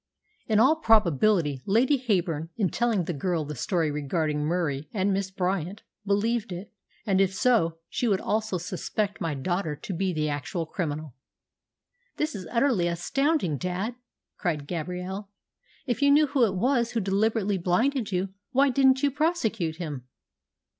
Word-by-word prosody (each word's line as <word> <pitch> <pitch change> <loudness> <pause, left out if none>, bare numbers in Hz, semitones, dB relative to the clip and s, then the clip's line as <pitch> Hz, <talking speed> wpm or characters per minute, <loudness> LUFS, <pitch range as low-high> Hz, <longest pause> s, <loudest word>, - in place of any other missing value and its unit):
In 215 -2 +3
all 275 +7 +5
probability, 185 - +3
Lady 240 +8 +4
Heyburn, 175 - 0
in 200 -5 +1
telling 235 -6 +1
the 175 - -3
girl 165 +1 -1
the 150 - -5
story 160 - 0
regarding 150 +1 -1
Murie 155 -3 -1
and 200 -1 +1
Miss 195 0 -1
Bryant, 185 +1 -2 0.2
believed 220 +2 +1
it, 180 +4 -7 0.3
and 195 -3 +3
if 190 -1 +1
so 190 -10 +2
she 245 - -1
would 195 -3 +2
also 215 -3 -1
suspect 200 +3 -3
my 165 -3 -1
daughter 170 +2 -2
to 190 - -6
be 185 +2 0
the 155 -3 -1
actual 145 +4 -3
criminal." 155 -4 -4 1.0
"This 305 0 -1
is 185 -4 -6
all 235 - -5
utterly 235 -9 +3
astounding, 180 - 0
dad!" 185 +6 -2 0.5
cried 155 -6 -1
Gabrielle. 180 +5 -4 0.6
"If 245 0 -2
you 280 - +5
knew 295 +2 +6
who 270 -4 +3
it 195 - -3
was 240 +3 +1
who 235 - +1
deliberately 205 0 +1
blinded 225 +7 +1
you, 185 +1 -1 0.2
why 275 +2 +3
didn't 265 +1 +4
you 285 - +3
prosecute 230 - 0
him?" 150 -7 -6
190 Hz, 160 wpm, -27 LUFS, 165-230 Hz, 1.0 s, knew